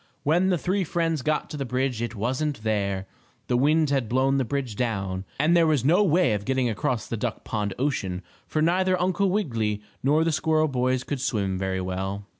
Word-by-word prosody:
When 175 +6 +3
the 180 - +2
three 185 +4 0
friends 165 -2 -1
got 155 +2 0
to 150 - -5
the 140 - -2
bridge 125 -2 -1
it 120 0 -3
wasn't 130 +4 -2
there. 100 -3 -1 0.4
The 125 - 0
wind 150 +3 +3
had 135 -6 0
blown 135 +2 +2
the - - +2
bridge 130 -2 -3
down, 95 -5 -2
and 155 +4 +4
there 170 -1 +5
was 145 -5 +2
no 175 +8 +5
way 175 - +3
of 105 -1 -2
getting 130 +1 +1
across 110 +1 -1
the 115 - -4
duck 115 0 -3
pond 105 -3 -2
ocean, 95 -10 -1 0.2
for 155 - 0
neither 185 +2 +2
Uncle 185 +2 +1
Wiggily 115 - -1 0.2
nor 150 +4 +3
the 165 - +1
squirrel 155 0 +2
boys 130 -1 0
could 140 -2 -4
swim 100 -9 0
very 95 -1 -1
well. 95 +2 -3
130 Hz, 205 wpm, -25 LUFS, 110-155 Hz, 0.4 s, there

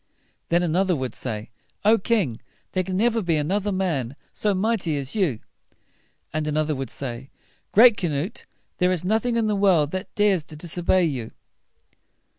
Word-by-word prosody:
Then 175 +1 +3
an 165 -2 0
oth 190 +1 +2
er 180 - +3
would 130 -3 -3
say, 110 -3 -5 0.3
"O 220 +2 +6
king! 190 - 0 0.3
there 185 - +1
can 185 0 -3
never 230 +2 +2
be 170 -4 +1
an 150 +2 -1
oth 205 +1 0
er - - +1
man 155 -10 -1 0.2
so 205 -2 0
mighty 190 -6 0
as 140 +4 -3
you." 170 - +1 0.9
And 155 0 -1
another 155 0 0
would 135 -3 -4
say, 130 0 -6 0.4
"Great 230 0 +7
Canute, 170 +3 -3 0.3
there 180 0 +3
is 180 -1 -1
nothing 225 +4 +1
in 230 - +2
the 210 -1 +1
world 180 -7 +3
that 185 0 -5
dares 200 -5 +3
to 155 - -11
dis 160 +2 -6
o - - -2
bey 185 +1 +3
you." 130 -9 -2
175 Hz, 190 wpm, -24 LUFS, 150-200 Hz, 0.9 s, Great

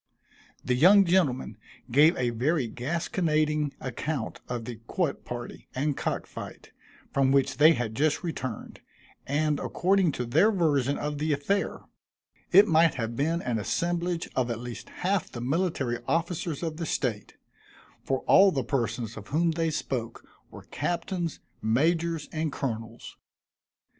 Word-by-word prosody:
The 125 - +1
young 190 +10 +6
gentlemen 135 - +1 0.3
gave 150 +6 +5
a 125 -1 0
very 130 +3 0
gasconading 155 - 0
account 135 +4 -4
of 120 -2 -3
the 120 -1 -6
quoit 170 -7 -1
party 120 -1 -7
and 140 +2 0
cock - - -2
fight, - - -10 0.4
from 135 -1 +3
which 135 -1 +2
they 155 +2 +7
had 120 -6 -3
just 150 +8 +1
returned, 130 -9 -5 0.5
and 150 +1 +1
according 190 -2 +2
to 125 - -3
their 160 - +4
version 145 - +1
of 150 0 -3
the 155 0 +1
affair, 170 +9 -1 0.7
it 200 +4 +8
might 165 0 +4
have 115 -1 -3
been 160 +6 0
an 120 -3 -1
assemblage 170 - -1
of 125 -2 +1
at 115 - -2
least 120 0 -8
half 190 0 -1
the 120 - -6
military 135 -3 -1
officers 165 -1 -1
of 160 -2 -3
the 165 -1 -3
state; 110 -7 -2 0.7
for 135 -1 -1
all 195 0 +6
the 135 -6 -1
persons 120 -4 -2
of 110 -2 -9
whom 165 +5 +1
they 165 0 0
spoke, 120 -6 -4 0.2
were - - -11
captains, 175 -1 -2 0.2
majors 160 +7 +1
and 155 -1 -2
colonels. 115 -4 -5
150 Hz, 145 wpm, -27 LUFS, 125-170 Hz, 0.7 s, it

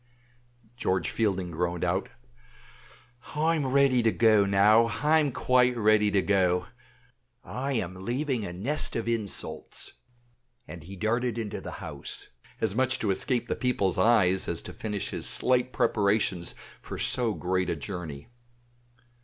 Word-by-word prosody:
George 95 -7 0
Fielding 95 -5 -1
groaned 85 +1 -2
out, 90 +2 0 1.3
"I'm 155 -2 +1
ready 135 -2 +4
to 115 -1 +3
go 110 -3 +4
now 105 +4 +5
I'm 150 +5 +2
quite 125 0 +2
ready 105 -1 +4
to 100 -1 +2
go 90 -3 +2 0.8
I 135 +2 -3
am 90 -7 -2
leaving 125 +1 -1
a 90 - -4
nest 115 +13 0
of 115 0 -2
insults;" 115 -4 -2 0.7
and 85 - -9
he 95 +5 -10
darted 120 +4 -1
into 110 -4 -4
the - - -7
house, - - -6 0.3
as 110 -3 0
much 130 +3 +1
to 105 - 0
escape 120 +5 0
the - - -1
people's 100 -8 0
eyes 95 -3 +3
as - - -3
to - - -8
finish 105 -3 -4
his - - -4
slight 125 0 +1
preparations 100 -6 +1 0.3
for - - -7
so 115 -4 0
great 90 0 -1
a - - 0
journey. 85 -8 -7
110 Hz, 140 wpm, -27 LUFS, 95-125 Hz, 1.3 s, now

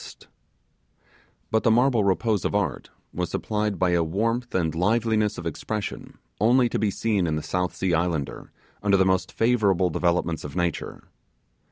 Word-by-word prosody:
But 110 - +2
the - - +2
marble 120 -1 +3
repose 100 +2 +1
of - - -1
art 85 -11 -1 0.2
was 90 0 -2
supplied 105 -2 -2
by 90 0 +2
a 85 -1 +2
warmth 115 +9 -1
and 80 -4 +1
liveliness 105 +4 +1
of 85 - -7
expression 100 +6 -5 0.2
only 125 +2 +4
to - - -2
be 105 - +1
seen 100 -3 0
in 80 - 0
the 75 - -3
South 90 0 -2
Sea 95 -2 -1
Islander 80 -5 -2 0.3
under 100 -1 +3
the 95 - +3
most 95 0 +1
favourable 100 -7 +2
developments 85 -1 0
of 75 - -8
nature. 85 -2 -2
95 Hz, 160 wpm, -25 LUFS, 85-110 Hz, 0.3 s, only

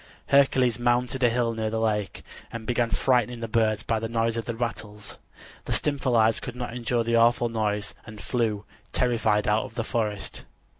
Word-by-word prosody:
Hercules 130 -4 +4
mounted 120 +2 +1
a 120 - +5
hill 115 0 0
near 110 -1 -2
the 110 +1 -2
lake, 105 -3 -1 0.3
and 115 -1 -7
began 120 0 0
frightening 125 -2 +1
the 115 - -4
birds 110 -1 +1
by 115 -1 0
the 115 0 -4
noise 115 0 0
of 115 - -3
the 115 - -4
rattles. 105 -3 -5 0.5
The - - -1
Stymphalides 125 -6 +2
could 125 - -6
not 125 -1 -5
endure 120 -1 0
the 115 0 0
awful 120 +1 +3
noise 105 -2 -1
and 110 -2 -11
flew, 110 -4 -1 0.3
terrified, 110 -4 +1
out 105 +1 +2
of 115 - -12
the 115 - -1
forest. 110 -4 -3
115 Hz, 185 wpm, -26 LUFS, 110-120 Hz, 0.5 s, a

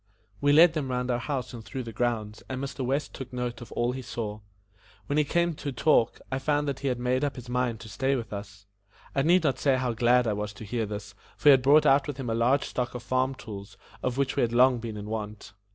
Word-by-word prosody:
We 145 0 +4
led 165 +3 +7
them 150 -5 -2
round 125 0 -1
our 120 - 0
house 130 -1 -3
and 115 -2 -8
through 125 +6 -5
the 115 -1 -8
grounds 110 -2 -2
and 130 -1 -3
Mr. 140 0 -4
West 135 +3 -1
took 130 -2 -8
note 125 -1 -4
of 120 - -10
all 120 +1 +1
he 130 +1 -5
saw. 110 -4 -5 0.7
When 145 - -1
we 150 - +5
came 170 +3 +1
to 145 -2 -5
talk, 125 -2 +2
I 130 - 0
found 145 +1 0
that 140 -2 -2
he 140 - -3
had 125 -2 0
made 125 +2 0
up 145 - -1
his 125 -2 -9
mind 125 -2 -1
to 110 - -9
stay 135 +5 0
with 115 -4 -5
us. 100 0 -8 0.5
I 135 - +2
need 170 +4 +4
not 140 -4 +1
say 135 -3 +3
how 125 -2 -1
glad 120 +2 +3
I 110 - +1
was 105 0 -4
to 105 +2 -10
hear 115 +1 -2
this, 105 0 -6 0.2
for 150 - +5
he - - +11
had 135 -2 +6
brought 150 +4 +5
out 140 0 +4
with 145 -3 -4
him 125 -4 -3
a - - +1
large 125 +5 +3
stock 125 -1 -3
of 120 - -6
farm 130 +1 0
tools, 100 -4 -9 0.2
of 125 0 -2
which 140 -1 0
we - - +1
had 115 -1 +1
long 125 0 +5
been 115 -2 -6
in 105 - -6
want. 105 -3 -6
125 Hz, 265 wpm, -27 LUFS, 115-135 Hz, 0.7 s, he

